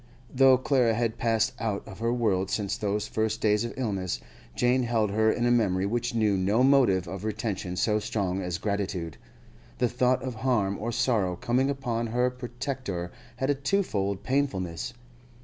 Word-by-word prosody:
Though 130 0 +6
Clara 125 -3 +2
had 115 0 -1
passed 115 -1 +1
out 105 -3 -2
of 95 - -10
her 115 +1 0
world 100 -6 +1
since 100 -3 -1
those 105 0 -2
first 110 0 -1
days 105 0 +2
of 120 - -3
illness, 100 -8 -2 0.4
Jane 125 +1 +2
held 115 -4 +1
her 110 +1 +3
in 120 - 0
a 120 - +3
memory 100 -6 +2
which 120 +3 -1
knew 110 -3 +2
no 100 +6 +2
motive 125 -10 +4
of 95 +3 -6
retention 100 -4 -3
so 105 +3 +1
strong 100 -3 -2
as 90 -2 -2
gratitude. 95 -5 -3 0.6
The 125 - +2
thought 125 +2 +1
of 130 -1 -3
harm 105 -7 +1
or 115 +3 -2
sorrow 115 -6 +1
coming 125 +8 +1
upon 120 -4 -2
her 125 +2 +1
protector 120 -7 -5 0.2
had 130 +3 0
a - - +3
twofold 135 - -1
painfulness. 120 -7 -1
110 Hz, 170 wpm, -27 LUFS, 100-125 Hz, 0.6 s, Though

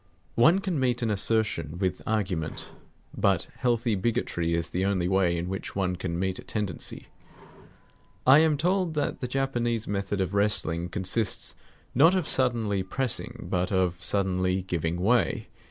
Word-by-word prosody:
One 160 +10 +5
can 180 -6 -1
meet 125 -2 +1
an 110 - +1
assertion 100 -6 0
with 95 -1 -1
argument; 95 -7 -1 0.4
but 95 -4 +1
healthy 120 -2 +1
bigotry 95 -5 0
is 85 -1 -2
the 90 - -1
only 95 -3 +1
way 90 -2 +2
in 85 +1 -3
which 95 +1 -5
one 95 -2 0
can 85 -1 -3
meet 95 0 -1
a - - -9
tendency. 105 -6 -4 1.2
I 135 +3 +8
am 155 -2 +3
told 180 +1 +1
that 150 - -1
the 125 - -2
Japanese 120 -4 -1
method 100 0 -2
of 95 0 -1
wrestling 90 -5 +1
consists 100 +3 0 0.4
not 165 +8 +6
of 180 -5 0
suddenly 115 -6 +1
pressing, 120 +6 -3
but 90 +2 -1
of 90 -2 0
suddenly 95 -1 +1
giving 85 -2 -2
way. 115 +6 +1
100 Hz, 155 wpm, -27 LUFS, 90-120 Hz, 1.2 s, I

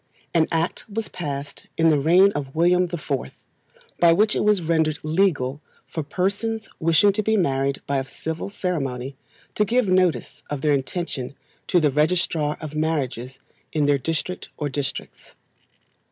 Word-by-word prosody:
An 160 -2 +3
Act 165 +5 -1
was 220 +1 -3
passed 145 -4 -6
in 165 0 +5
the 150 - +3
reign 180 +7 +5
of 140 -3 -5
William 180 +2 +4
the 175 0 -4
Fourth, 65 - -4 0.6
by 170 -1 +6
which 210 +5 +3
it - - +1
was 210 -1 +4
rendered 160 -1 +1
legal 155 -5 +1 0.2
for 160 - -4
persons 200 +8 -2
wishing 165 +5 +5
to 215 - 0
be 220 +1 +2
married 135 -5 0
by 140 -1 0
a 135 0 -6
civil 160 +6 -5
ceremony, 135 -10 -3 0.4
to 210 - +2
give 235 +2 +2
notice 185 -9 +1
of 145 -2 -3
their 150 0 +3
intention 140 -1 -3 0.3
to 180 - +4
the 150 -3 +3
Registrar 150 0 +1
of 155 -2 -7
Marriages 135 -5 -2 0.4
in 150 -2 +2
their 145 -1 +3
district 165 +6 -3
or 150 -2 -2
districts. 140 0 -5
160 Hz, 160 wpm, -23 LUFS, 140-180 Hz, 0.6 s, by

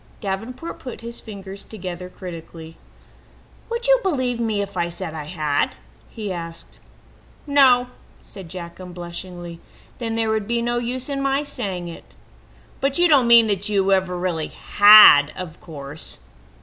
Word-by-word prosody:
Davenport 225 +10 -5
put 250 -3 -8
his 235 +1 -7
finger 200 -3 -10
tips 200 - -14 0.5
critically 180 -3 -7 0.3
together. 165 - -19 0.9
"Would 470 +1 -3
you - - +5
believe 255 - -1
me 220 -3 0
if 200 0 -9
I 170 -1 -1
said 170 -1 -6
I 155 -2 -6
had?" 150 -3 -1 0.3
he 210 -4 -5
asked. 165 -1 -9 0.7
"No," 270 -4 +5 0.4
said 190 -5 -12
Jack 170 0 -8
unblushingly. 175 -1 -8 0.4
"Then 225 -2 -3
there 225 -1 0
would 215 -2 -1
be 235 0 0
no 240 0 0
use 245 +2 -4
in 280 -1 -3
my 275 +1 +1
saying 200 -11 -4
it." 170 - -12 0.6
"But 275 0 0
you 350 0 +5
don't 280 -6 +4
mean 235 -1 +8
that 205 -1 -1
you 195 -2 +1
ever 185 -2 +1
really 175 -3 -2
had, 205 -9 +7
of 180 -3 -8
course?" 145 -1 -10
200 Hz, 155 wpm, -22 LUFS, 175-245 Hz, 0.9 s, mean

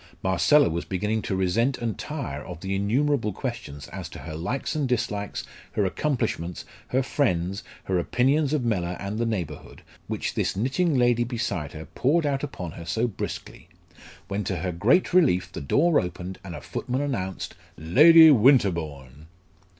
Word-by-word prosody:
Marcella 115 - +4
was 85 +1 -2
beginning 105 +4 -1
to 95 - -2
resent 110 +8 +1
and 115 -4 -2
tire 70 -2 -5
of 85 -2 -9
the 95 0 -3
innumerable 115 +3 +1
questions 110 - -6
as - - -7
to - - -10
her 80 - -8
likes 90 - -3
and 145 -4 -1
dislikes, 110 -5 -2 0.3
her 105 - +1
accomplishments, 100 - -2 0.2
her 130 +1 +1
friends, 100 - 0 0.2
her 95 -2 0
opinions 135 - +2
of 150 -5 0
Mellor 90 -6 -1
and 100 +2 -4
the 115 - +1
neighbourhood, 85 -10 -5 0.2
which - - -3
this - - -1
knitting 135 - +1
lady 120 -1 +3
beside 115 - -3
her 80 +1 -8
poured 155 +5 +1
out 140 -2 0
upon 90 - -5
her 85 0 -9
so 110 +8 0
briskly, 110 -6 -6 0.6
when 100 +1 -2
to 95 - -1
her 90 +2 -2
great 110 - +2
relief 145 - +3
the - - -6
door 150 - +3
opened 90 +1 -5
and 90 -3 -7
a - - -8
footman 130 +2 -3
announced 95 -10 -3 0.2
"Lady 155 - +8
Winterbourne." 85 - +2
105 Hz, 165 wpm, -25 LUFS, 90-135 Hz, 0.6 s, Lady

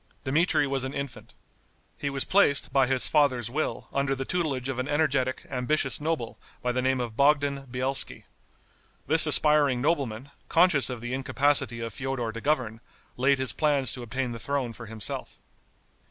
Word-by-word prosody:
Dmitri 145 +1 +2
was 135 -1 -2
an 130 +1 -5
infant. 140 -3 -7 0.6
He 140 - -3
was 135 -1 -1
placed, 145 -9 +2
by 135 -2 +4
his 130 -1 +3
father's 130 -6 +1
will, 155 +4 -3
under 140 0 0
the 135 0 -4
tutelage 145 -8 -2
of 135 -2 -3
an 130 - -2
energetic, 140 -4 0
ambitious 135 +2 -1
noble, 155 -7 -3 0.2
by 125 - +1
the 125 +1 -1
name 130 0 +1
of 120 -3 -4
Bogdan 140 0 +2
Bielski. 130 +2 -1 0.8
This 160 0 +6
aspiring 150 -3 +4
nobleman, 135 -3 -1 0.2
conscious 165 -6 +4
of 125 -3 -5
the 120 +1 -5
incapacity 135 -2 0
of 115 -2 -5
Feodor 135 -3 -3
to 115 +1 -8
govern, 125 -7 -1 0.3
laid 135 +2 +3
his 130 0 +1
plans 145 -5 +1
to 125 - -6
obtain 125 +2 -3
the 115 - -6
throne 135 -4 -2
for 115 0 -10
himself. 110 -1 -5
135 Hz, 170 wpm, -27 LUFS, 125-145 Hz, 0.8 s, This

